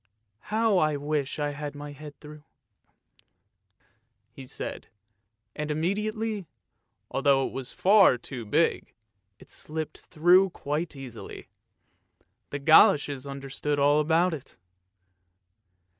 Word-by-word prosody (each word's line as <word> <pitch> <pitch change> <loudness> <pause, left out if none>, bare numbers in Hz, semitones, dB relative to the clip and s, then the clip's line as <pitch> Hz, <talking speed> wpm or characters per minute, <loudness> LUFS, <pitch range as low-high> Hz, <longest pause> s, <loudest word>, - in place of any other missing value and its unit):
" 105 +1 -50 0.2
How 220 -4 +3
I 155 -2 +2
wish 145 -1 -2
I 145 -1 -1
had 145 0 -6
my 145 0 -8
head 145 0 -11
through," 150 0 -12 1.9
he 130 - -11
said, - - -6 0.7
and 150 0 -4
imme 160 +6 0
diately, 215 -2 -3 0.6
although 135 -1 +2
it - - -6
was 130 -2 -6
far 195 -8 +5
too 120 0 -7
big, 150 +10 0 0.4
it - - -16
slipped 155 0 -6
through 180 +4 +4
quite 155 -1 -4
easily. 130 -5 -10 1.0
The 145 - -4
goloshes 145 -3 +4
understood 140 +1 -3
all 145 +1 +4
about 165 +3 +2
it. 140 -4 -9
150 Hz, 115 wpm, -27 LUFS, 140-170 Hz, 1.9 s, far